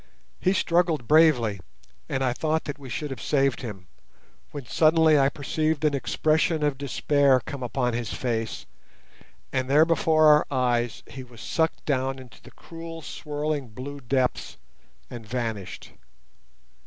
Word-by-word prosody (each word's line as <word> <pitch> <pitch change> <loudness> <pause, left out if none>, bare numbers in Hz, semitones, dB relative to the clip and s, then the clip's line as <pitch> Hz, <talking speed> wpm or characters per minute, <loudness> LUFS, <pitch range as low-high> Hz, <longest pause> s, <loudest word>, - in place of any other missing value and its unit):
He 185 - +2
struggled 170 - +1
bravely, 145 -10 +4 0.5
and 135 - -1
I 125 -2 +1
thought 160 +4 -1
that 145 0 -6
we 135 -2 -10
should 145 +5 -4
have 125 -5 -6
saved 135 -3 +1
him, 100 -6 -7 0.6
when 145 -3 -8
suddenly 155 +4 +4
I 135 0 +4
perceived 155 +1 -1
an 150 - +2
expression 155 +3 +1
of 145 -2 +1
despair 140 -1 +2
come 140 -2 -6
upon 125 0 -1
his 115 -2 -3
face, 115 -3 -3 0.9
and 130 0 -1
there 150 +3 +6
before 165 -2 +3
our 150 0 +6
eyes 120 -3 0
he 130 - -9
was 120 -2 -15
sucked 160 +7 -1
down 135 -2 0
into 130 -3 -14
the - - -14
cruel 165 -1 -10
swirling 150 -2 -4
blue 130 +6 -8
depths, 130 0 -1 0.5
and 120 -2 -7
vanished. 110 -4 -5
140 Hz, 145 wpm, -25 LUFS, 125-155 Hz, 0.9 s, there